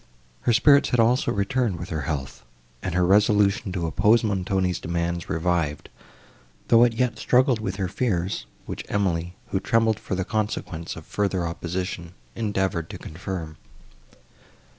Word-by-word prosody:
Her 120 - +1
spirits 140 +4 +5
had 125 - +1
also 120 +5 +3
returned 100 0 0
with - - -7
her 80 -2 -2
health, 70 -3 -4 0.4
and 90 -2 -3
her 90 -1 +3
resolution 105 +2 +3
to 90 -3 -2
oppose 105 +8 +3
Montoni's 95 -3 0
demands 85 0 -2
revived, 85 -3 -1 0.8
though 115 0 +7
it 120 -1 +4
yet 125 +2 0
struggled 125 -1 +3
with 110 - -3
her 95 -2 -1
fears, 95 -3 -1 0.2
which - - -5
Emily, 90 -3 -1
who 95 - 0
trembled 110 +1 +2
for - - -4
the 95 0 -2
consequence 100 -6 -3
of 80 - -10
further 95 -4 -1
opposition, 85 +1 -4 0.2
endeavoured 95 -7 -1
to - - -7
confirm. 80 -1 -6
95 Hz, 145 wpm, -24 LUFS, 85-110 Hz, 0.8 s, though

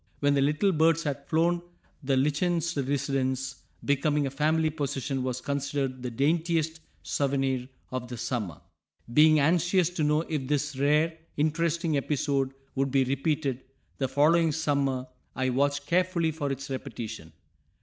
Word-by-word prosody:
When 145 0 +3
the 140 - +2
little 150 +8 +2
birds 165 0 +3
had 145 -1 -4
flown 170 +2 +2 0.4
the 135 -2 +1
lichened 155 +5 +1
residence, 135 -2 -1 0.3
becoming 145 +1 +2
a 135 - -2
family 155 +3 +1
possession, 140 -3 -2
was 125 0 -2
considered 140 -1 -2
the 125 - -3
daintiest 160 +5 0 0.2
souvenir 135 -2 0 0.2
of 130 -1 -4
the 120 -1 -6
summer. 105 - -3 0.5
Being 155 +2 +6
anxious 175 +3 +3
to 175 -3 -2
know 150 +1 +3
if 150 -5 -3
this 145 0 -1
rare, 150 +4 +2 0.2
interesting 160 +1 +1
episode 135 -1 0 0.2
would 135 0 0
be 135 0 +3
repeated, 135 0 -1 0.4
the 135 - +1
following 160 +4 +3
summer 140 -4 0 0.3
I 130 -1 0
watched 140 +2 +1
carefully 170 0 +1
for 145 -3 -3
its 135 0 -4
repetition. 115 - -6
145 Hz, 140 wpm, -28 LUFS, 135-160 Hz, 0.5 s, Being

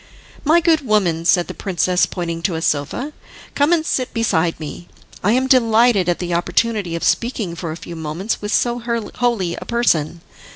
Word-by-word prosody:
"My 320 +4 +4
good 325 -2 +3
woman," 190 - +1
said 175 0 +4
the - - -6
princess 180 -1 +1
pointing 170 -2 -4
to 170 0 -1
a 160 - -3
sofa, 175 - -1 0.4
"come 290 +3 +2
and 325 -2 +2
sit 255 -4 -1
beside 175 -8 +1
me. 160 +2 -8 0.4
I 210 - +3
am 260 +2 +2
delighted 230 -6 +4
at 175 - +1
the 175 -1 -3
opportunity 195 +1 0
of 170 - -4
speaking 230 -7 0
for 170 -1 -5
a 160 - -6
few 170 - -9
moments 160 +7 -3
with 205 0 -4
so 240 +1 +1
holy 235 -5 -1
a - - -7
person." 170 -9 0
200 Hz, 180 wpm, -19 LUFS, 170-240 Hz, 0.4 s, My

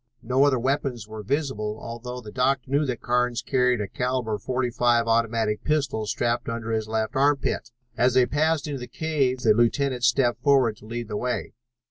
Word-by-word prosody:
No 130 +4 +3
other 140 -2 +3
weapons 125 -3 -1
were 110 0 -7
visible, 110 -4 -2
although 125 +2 -7
the 105 -3 -10
doctor 130 +1 0
knew 145 +1 +2
that 125 -3 -3
Carnes 125 -1 0
carried 125 -2 +2
a 100 - -3
caliber 125 -1 -2
.45 120 0 +1
automatic 115 -2 +1
pistol 140 -8 0
strapped 120 +1 -1
under 115 -1 -4
his 110 -1 -1
left 110 0 -2
armpit. 140 +1 +1 0.3
As 125 +1 +2
they 130 -1 +6
passed 155 +3 +1
into 145 -3 -4
the 125 - -7
cave 140 -6 -1
the 110 -3 +5
lieutenant 125 +3 +1
stepped 125 -1 +2
forward 130 -7 +3
to 105 - -15
lead 120 0 -5
the 105 -1 -3
way. 125 +3 -3
125 Hz, 180 wpm, -25 LUFS, 115-135 Hz, 0.3 s, they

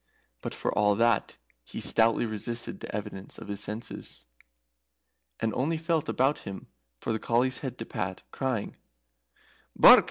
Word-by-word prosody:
But, - - -4
for - - -1
all 105 -1 +4
that, 115 -1 +2 0.3
he - - -7
stoutly 115 +1 +4
resisted 115 +2 -4
the - - -6
evidence 100 -2 -5
of - - -9
his 100 -1 -2
senses, 105 - -4 1.1
and 110 -1 0
only 155 +8 0
felt 165 -1 0
about 135 +3 +2
him 95 -1 -7 0.3
for 115 - -1
the 110 - -1
collie's 125 +4 +2
head 130 -3 -5
to 115 - -5
pat, 95 -3 -4
crying: 130 -6 -2 1.0
"Bark! - - +10
115 Hz, 150 wpm, -29 LUFS, 105-130 Hz, 1.1 s, Bark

